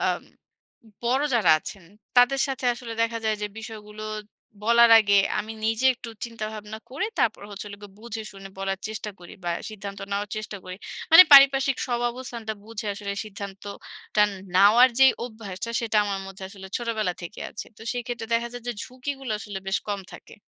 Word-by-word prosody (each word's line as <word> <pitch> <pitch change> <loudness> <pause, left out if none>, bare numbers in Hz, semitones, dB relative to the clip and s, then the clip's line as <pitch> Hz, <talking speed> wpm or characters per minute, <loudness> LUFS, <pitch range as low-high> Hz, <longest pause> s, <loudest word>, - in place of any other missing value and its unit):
অ্যা - - +2 1.0
বড় 255 +4 +2
যারা 205 -8 +4
আছেন, 190 +2 -9 0.3
তাদের 245 +2 +5
সাথে 265 -1 -4
আসলে 235 -2 -7
দেখা 230 0 0
যায় 215 -1 +1
যে, - - 0
বিষয়গুলো 215 -1 -9 0.6
বলার 235 +1 +6
আগে, 200 -1 +3 0.2
আমি 215 +1 -4
নিজে 225 +4 +2
একটু 240 -1 -10 0.2
চিন্তাভাবনা 215 -2 -6
করে, 285 +10 -2
তারপর 220 -3 +1
হচ্ছে 205 +1 -7
হলো 200 - -9
গিয়ে 200 -1 -12
বুঝে 225 -1 -6
শুনে 195 0 -10
বলার 195 0 -2
চেষ্টা 215 0 -5
করি 175 +4 -12
বা, 175 - 0 0.2
সিদ্ধান্ত 200 -2 -7
নেওয়ার 200 +1 -1
চেষ্টা 215 -1 -5
করি। 185 0 -7 0.3
মানে 330 +3 +12
পারিপার্শ্বিক 275 -1 +8
সব 240 -1 0
অবস্থানটা 235 -3 -6
বুঝে 220 -1 -6
আসলে 200 0 -4
সিদ্ধান্তটা 200 +1 -4 0.3
নেওয়ার 215 +6 +7
যে 265 - +10 0.2
অভ্যাসটা, 220 -2 -6
সেটা 225 -2 -1
আমার 200 -1 -2
মধ্যে 195 0 -10
আসলে 195 -1 -11
ছোটবেলা 220 -6 -1
থেকে 175 +4 -8
আছে। - - -7
তো - - -19
সেইক্ষেত্রে 240 -1 -4
দেখা 235 +1 0
যায় 245 -1 -7
যে, - - 0
ঝুঁকিগুলো 260 0 -6
আসলে 205 -2 -6
বেশ 195 - +1
কম 200 -1 -1
থাকে। - - -13
220 Hz, 175 wpm, -25 LUFS, 200-240 Hz, 1.0 s, মানে